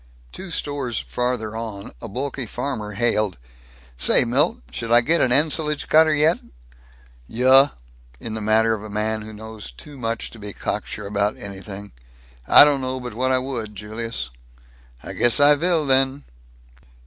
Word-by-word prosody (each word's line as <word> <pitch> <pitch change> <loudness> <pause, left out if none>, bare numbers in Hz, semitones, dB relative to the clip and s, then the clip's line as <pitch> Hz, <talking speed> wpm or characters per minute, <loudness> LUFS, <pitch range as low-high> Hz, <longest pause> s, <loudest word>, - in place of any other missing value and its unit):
Two 190 - -9
stores 145 -7 -3
farther 125 -3 -3
on, 110 -3 -6
a - - -6
bulky 130 +2 -4
farmer 110 -4 -5
hailed, 105 -3 0 0.6
"Say, - - +5
Milt, - - +1
should 115 0 -5
I 120 0 +7
get 165 +8 +2
an 125 - +2
ensilage 150 +2 +1
cutter 160 0 +5
yet?" 155 +3 +3 0.9
"Yuh," 130 +4 +5 0.5
in 115 - -7
the 110 - -5
manner 110 +1 +2
of 110 - -4
a 110 - -9
man 110 +1 -2
who 110 +1 -9
knows 110 - -9
too 135 - -12
much 115 -1 -4
to 115 - -13
be 105 -1 -7
cocksure - - -5
about 100 +1 -1
anything, 100 0 -8 0.6
"I - - +10
don't 145 -2 +2
know 130 0 -3
but 125 -2 -7
what 130 +3 -1
I 130 - +3
would, 120 -5 -5
Julius." 105 - -5 0.7
"I - - -7
guess 120 -1 +3
I 145 +1 +8
vill 165 +1 +1
then." 135 +1 +2
120 Hz, 160 wpm, -22 LUFS, 105-135 Hz, 0.9 s, I